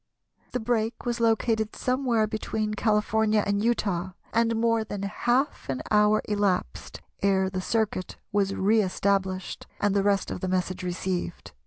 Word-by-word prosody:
The 250 - 0
break 225 0 -1
was 240 -1 -1
located 225 -1 +1
somewhere 250 -4 +1
between 215 0 -2
California 215 0 +2
and 200 0 0
Utah, 190 -6 0 0.2
and 230 0 +2
more 230 0 +2
than 205 -2 -5
half 240 - 0
an 130 -1 -2
hour 210 0 +4
elapsed 200 - -1 0.2
ere 190 -1 +2
the 185 0 -2
circuit 210 -3 -1
was 200 -1 +1
re 215 +3 +3
established, 190 -1 -1
and 205 -1 +1
the 200 - +4
rest 200 0 +1
of - - -4
the 185 - -3
message 185 0 -1
received. 180 0 -3
210 Hz, 150 wpm, -26 LUFS, 190-225 Hz, 0.2 s, hour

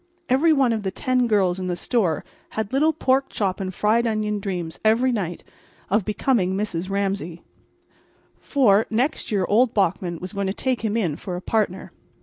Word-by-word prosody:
Every 280 +6 +4
one 270 -6 +3
of 220 - -2
the 195 - -2
ten 250 +4 0
girls 190 -4 +2
in 185 - -3
the 180 - -1
store 180 - 0 0.3
had 220 +1 -2
little 305 +4 +4
pork 270 -3 +1
chop 195 -2 -1
and 190 -1 -3
fried 220 +5 +2
onion 215 -1 -1
dreams 180 -5 -4
every 230 +4 +3
night 185 -7 -3 0.5
of 205 -1 +2
becoming 210 -3 +1
Mrs. 190 -3 -3
Ramsay. 195 -4 -2 1.0
For, 225 -7 +3
next 250 +4 -1
year 195 -3 +1
old 230 +3 +3
Bachman 180 -3 0
was 185 +3 -7
going 200 -1 -2
to 190 - -1
take 255 +2 -1
him 220 0 -1
in 170 -10 -1
for 180 - -5
a - - -3
partner. 200 -3 -1
210 Hz, 180 wpm, -23 LUFS, 185-235 Hz, 1.0 s, Every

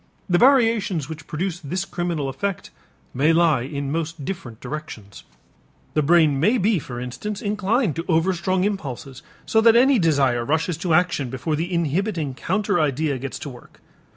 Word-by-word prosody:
The 175 -1 +2
variations 225 - +3
which 160 0 -9
produce 175 +2 -3
this 180 +4 -3
criminal 175 -6 -2
effect 185 +8 -4 0.4
may 145 +5 +3
lie 165 -6 +3
in 140 +1 -4
most 160 -2 -3
different 130 - -6
directions. 125 -8 -8 0.7
The 155 - +2
brain 155 -2 +4
may 215 - +3
be 205 -2 +2
for 120 -4 -7
instance 195 +12 -5
inclined 210 - 0
to 165 - -3
overstrong 185 +2 +1
impulses, 140 - -4 0.2
so 220 - +3
that 230 0 +6
any 260 +1 +5
desire 140 -8 +2
rushes 160 +5 0
to 170 -2 +1
action 175 -7 +1
before 130 +5 -2
the 170 +4 -3
inhibiting 170 -2 -1
counter 190 +7 0
idea 145 -2 0
gets 135 +1 -5
to - - -4
work. 125 -2 -14
165 Hz, 160 wpm, -22 LUFS, 140-190 Hz, 0.7 s, that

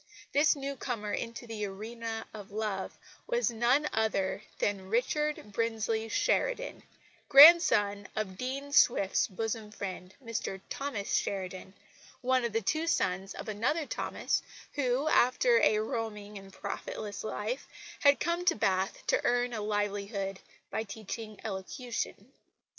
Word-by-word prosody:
This 295 +2 +4
newcomer 265 -6 -4
into 230 +1 -4
the 225 -2 -5
arena 225 +3 -5
of 205 -2 -9
love 205 -2 -3 0.3
was 480 - +1
none 245 +6 +2
other 200 -3 0 0.2
than 195 -2 -1
Richard 260 +1 0
Brinsley 225 0 -1
Sheridan, - - 0 0.5
grandson 270 - +8
of 210 -3 -2
Dean 275 +6 -4
Swift's 200 -8 +4
bosom 220 +2 -3
friend, 190 -3 -7
Dr 225 -4 -3
Thomas 265 -8 -3
Sheridan, 190 0 -4 0.5
one 255 0 +2
of 235 - -1
the 225 +1 0
two 315 +10 0
sons 190 - 0
of - - -7
another 250 +10 0
Thomas, - - -1 0.3
who, 265 +1 +1
after 390 - +4
a 215 - +4
roaming 215 -1 -3
and 195 0 -13
profitless 205 +1 -5
life, 220 +4 -3 0.3
had 285 -1 +5
come 345 +1 0
to - - +4
Bath 190 -2 0
to - - +2
earn 245 0 +1
a 220 - -3
livelihood 205 -1 -2 0.3
by - - -1
teaching 215 0 -7
elocution. 220 +5 -5
220 Hz, 130 wpm, -31 LUFS, 205-255 Hz, 0.5 s, grandson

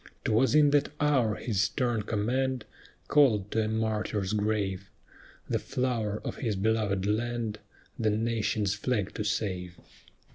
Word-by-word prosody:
'Twas 125 +6 +3
in 150 -1 +6
that 145 -1 +3
hour 130 -8 +2
his 105 -5 -1
stern 115 +2 0
command 125 +4 -1 0.4
Called 110 -9 +4
to 110 - +1
a 110 - 0
martyr's 110 -2 -1
grave 105 -3 -1 0.6
The - - 0
flower 120 -6 -1
of - - -4
his 115 -7 -1
belovèd 100 -1 0
land, 110 0 -1 0.4
The 110 -2 +2
nation's 110 -2 0
flag 105 -2 -1
to 105 - -3
save. 90 -4 -2
110 Hz, 135 wpm, -29 LUFS, 105-120 Hz, 0.6 s, in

